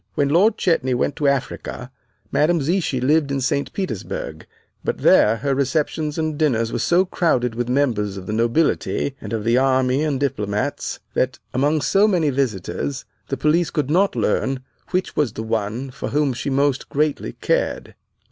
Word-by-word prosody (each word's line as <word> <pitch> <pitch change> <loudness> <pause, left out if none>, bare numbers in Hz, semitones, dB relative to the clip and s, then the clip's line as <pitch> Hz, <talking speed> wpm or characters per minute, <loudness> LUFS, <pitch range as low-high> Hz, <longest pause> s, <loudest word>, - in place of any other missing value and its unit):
When 140 -1 +2
Lord 200 +8 +4
Chetney 130 -9 +1
went 135 - 0
to 150 -3 +1
Africa, 130 -2 -2 0.4
Madame 155 +5 +3
Zichy 155 -2 0
lived 145 +3 +2
in 140 - 0
St. 135 +2 -1
Petersburg; 140 - -5 0.4
but - - -1
there 110 - +5
her 140 +3 -1
receptions 150 +2 -1
and 155 -2 -2
dinners 115 -7 +1
were - - -1
so 180 +2 +3
crowded 130 -10 +1
with 120 +1 -3
members 115 -7 0
of 95 - -7
the 105 - -4
nobility 125 +4 +1
and - - -7
of 110 -2 -2
the 115 +3 +3
army 130 +1 +2
and 145 -4 0
diplomats, 105 -7 -2
that - - 0 0.2
among 145 +4 +2
so 195 +7 +4
many 170 -8 +2
visitors 130 +1 -2 0.2
the 135 - -3
police 155 +5 +2
could 150 -3 -1
not 190 +1 +3
learn 125 +3 0 0.3
which 185 0 -1
was 140 -8 +1
the 110 - -5
one 110 +4 -2
for 135 - -5
whom 145 -2 +1
she 125 +3 -4
most 140 0 +1
greatly 145 - -1
cared. - - -1
140 Hz, 170 wpm, -21 LUFS, 125-155 Hz, 0.4 s, there